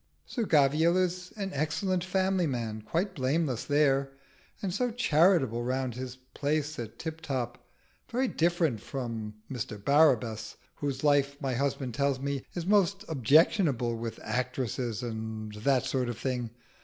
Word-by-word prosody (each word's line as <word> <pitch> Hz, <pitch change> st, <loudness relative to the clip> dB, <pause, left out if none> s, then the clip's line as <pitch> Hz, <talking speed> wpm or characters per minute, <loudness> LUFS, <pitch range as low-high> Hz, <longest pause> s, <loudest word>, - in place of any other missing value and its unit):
"Sir 235 Hz, -4 st, -2 dB
Gavial 155 Hz, +4 st, +4 dB
is 180 Hz, 0 st, -1 dB
an 195 Hz, -2 st, -3 dB
excellent 170 Hz, +5 st, 0 dB
family 185 Hz, -1 st, +1 dB
man 115 Hz, -5 st, -3 dB
quite 175 Hz, -, -1 dB
blameless 135 Hz, -3 st, 0 dB
there; 140 Hz, -2 st, +2 dB, 0.5 s
and 190 Hz, -3 st, -2 dB
so 245 Hz, +5 st, +1 dB
charitable 165 Hz, -, +3 dB
round 130 Hz, 0 st, -1 dB
his 125 Hz, +1 st, -6 dB, 0.2 s
place 150 Hz, 0 st, -1 dB
at 115 Hz, -2 st, -6 dB
Tiptop. 135 Hz, -7 st, -4 dB, 0.5 s
Very 255 Hz, +3 st, +1 dB
different 165 Hz, -, +1 dB
from 115 Hz, -4 st, -5 dB, 0.2 s
Mr 120 Hz, -3 st, -4 dB
Barabbas, 120 Hz, -3 st, +3 dB, 0.2 s
whose 140 Hz, -2 st, -3 dB
life, 140 Hz, -1 st, +3 dB
my 135 Hz, -3 st, -1 dB
husband 135 Hz, -1 st, -1 dB
tells 140 Hz, 0 st, +1 dB
me, 140 Hz, -1 st, -2 dB
is 175 Hz, -2 st, -3 dB
most 200 Hz, 0 st, +3 dB
objectionable, 140 Hz, -, +3 dB
with 115 Hz, 0 st, -5 dB
actresses 125 Hz, -2 st, -2 dB
and 110 Hz, -2 st, -5 dB
that 125 Hz, +4 st, +1 dB
sort 130 Hz, -2 st, 0 dB
of 120 Hz, -, -4 dB
thing. 125 Hz, -2 st, -2 dB
140 Hz, 140 wpm, -29 LUFS, 120-165 Hz, 0.5 s, Gavial